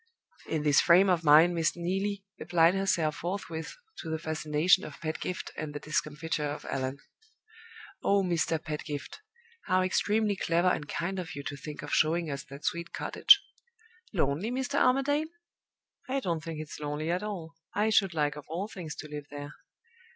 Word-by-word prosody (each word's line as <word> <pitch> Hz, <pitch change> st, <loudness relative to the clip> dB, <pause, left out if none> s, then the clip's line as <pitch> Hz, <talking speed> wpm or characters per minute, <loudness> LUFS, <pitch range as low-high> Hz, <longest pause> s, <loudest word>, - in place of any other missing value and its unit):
In 155 Hz, -2 st, -1 dB
this 145 Hz, -2 st, +5 dB
frame 185 Hz, +2 st, +6 dB
of 175 Hz, -2 st, +1 dB
mind 160 Hz, +3 st, +7 dB
Miss 165 Hz, -2 st, +1 dB
Neelie 195 Hz, +3 st, -2 dB, 0.2 s
applied 165 Hz, 0 st, +4 dB
herself 175 Hz, -6 st, +1 dB
forthwith 170 Hz, -, -4 dB, 0.2 s
to 160 Hz, -, -6 dB
the 160 Hz, -, -1 dB
fascination 155 Hz, +3 st, +2 dB
of 150 Hz, -, -9 dB
Pedgift 160 Hz, +3 st, -4 dB
and 150 Hz, -1 st, -5 dB
the -, -, -3 dB
discomfiture 150 Hz, 0 st, -2 dB
of 145 Hz, -, -6 dB
Allan. 130 Hz, +1 st, -2 dB, 1.0 s
"Oh, 200 Hz, -1 st, +3 dB
Mr. 165 Hz, -2 st, +1 dB
Pedgift, 150 Hz, -2 st, -5 dB, 0.5 s
how 185 Hz, -1 st, +3 dB
extremely 205 Hz, +3 st, +1 dB
clever 175 Hz, 0 st, +2 dB
and 150 Hz, -4 st, -2 dB
kind 185 Hz, +4 st, -2 dB
of 180 Hz, -3 st, -6 dB
you 140 Hz, -, -6 dB
to 145 Hz, -, -4 dB
think 145 Hz, +1 st, -8 dB
of 145 Hz, -, -5 dB
showing 160 Hz, 0 st, +2 dB
us 140 Hz, -, -4 dB
that 140 Hz, +3 st, -10 dB
sweet 170 Hz, -1 st, -2 dB
cottage! -, -, +5 dB, 0.7 s
Lonely, 165 Hz, +2 st, 0 dB
Mr. 265 Hz, +3 st, -1 dB
Armadale? 285 Hz, +4 st, +3 dB, 0.8 s
I 275 Hz, +1 st, +1 dB
don't 170 Hz, -9 st, -2 dB
think 160 Hz, -2 st, -5 dB
it's 155 Hz, -1 st, -7 dB
lonely 150 Hz, +2 st, -2 dB
at 180 Hz, +1 st, 0 dB
all; 185 Hz, -6 st, -5 dB, 0.2 s
I 215 Hz, +2 st, +2 dB
should 195 Hz, -5 st, +3 dB
like 150 Hz, -1 st, +1 dB
of 150 Hz, -2 st, -9 dB
all 175 Hz, +6 st, -3 dB
things 175 Hz, -7 st, -7 dB
to 155 Hz, -, -8 dB
live 150 Hz, -1 st, -7 dB
there. 145 Hz, 0 st, -7 dB
165 Hz, 170 wpm, -29 LUFS, 150-185 Hz, 1.0 s, mind